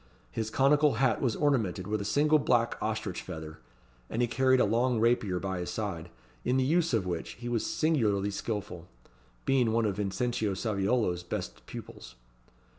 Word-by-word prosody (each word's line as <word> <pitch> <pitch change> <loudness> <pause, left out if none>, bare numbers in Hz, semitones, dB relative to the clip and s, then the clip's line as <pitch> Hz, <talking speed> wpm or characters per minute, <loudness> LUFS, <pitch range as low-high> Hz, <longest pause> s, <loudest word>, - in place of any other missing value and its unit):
His 110 -1 -3
conical 145 +4 +4
hat 130 -4 +2
was 120 -5 +1
ornamented 110 -11 +1
with 105 +1 -1
a - - -4
single 150 +6 +3
black 120 -4 +2
ostrich - - -2
feather; 80 0 -8 0.5
and 115 - -3
he - - +2
carried 130 +1 +3
a - - +5
long 120 +3 +2
rapier 115 -5 +2
by 95 -1 -3
his 90 - -4
side, 90 -6 -4 0.3
in 125 +1 +1
the 130 - +3
use 165 +5 +2
of 110 -6 +1
which 85 -2 -3
he 120 - -8
was 120 -2 -1
singularly 105 -11 +1
skilful; 100 -5 -4 0.6
being 125 -4 +3
one 115 0 +2
of 100 -3 -1
Vincentio 105 +1 -1
Saviolo's 100 -2 0
best 90 - -5
pupils. - - -9
110 Hz, 170 wpm, -29 LUFS, 100-130 Hz, 0.6 s, a